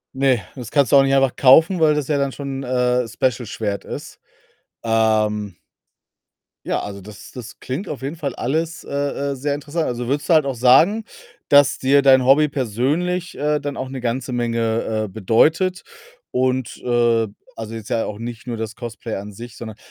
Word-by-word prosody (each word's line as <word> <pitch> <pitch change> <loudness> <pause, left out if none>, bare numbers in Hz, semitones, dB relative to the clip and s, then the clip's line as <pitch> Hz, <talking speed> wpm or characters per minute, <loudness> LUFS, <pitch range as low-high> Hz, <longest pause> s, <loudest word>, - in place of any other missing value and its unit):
Ne, 130 -4 +2
das 125 -3 -8
kannst 140 -5 +2
du - - +6
auch 135 - +7
nicht 135 0 +1
einfach 135 -1 +3
kaufen, 160 +7 +5
weil 155 -1 +4
das 150 -3 -2
ja 150 -2 +1
dann 140 -1 0
schon, 135 -1 -5
äh, 125 -1 +1
Special-Schwert 115 -5 -2
ist. - - -8 0.6
Ähm 110 -3 +1 1.1
ja, - - -1
also 100 -1 -7
das 105 +1 -12
das 120 -3 -10
klingt 155 +10 -5
auf 140 - -6
jeden 140 +5 -4
Fall 140 -5 -4
alles, 160 +6 -2
äh - - -13 0.4
äh, - - -3
sehr 140 +2 -2
interessa 150 +3 -3
also, 120 -1 -3
würdest 145 +3 -1
du - - +5
halt 155 -3 +4
auch 135 -2 -2
sagen, 160 - +4 0.5
dass 145 -1 +5
dir 140 +2 +3
dein 130 -2 +5
Hobby 145 +3 +5
persönlich, 145 - -1
äh, 150 +1 0
dann 145 0 -5
auch 130 - -4
'ne 135 -2 -6
ganze 125 +2 -2
Menge, 115 -2 -1
äh, - - -6
bedeutet 155 - +1 0.5
und, 130 -1 -1
äh 120 -2 +2 0.3
also, 110 0 -6
jetzt 110 -2 -8
ja 115 -1 0
auch 105 +1 -6
nicht 120 0 -7
nur 120 -2 -4
das 110 0 -5
Cosplay 120 -2 -6
an 100 +1 -7
sich, 115 +3 -10
sondern 110 -2 -8
130 Hz, 185 wpm, -20 LUFS, 115-145 Hz, 1.1 s, auch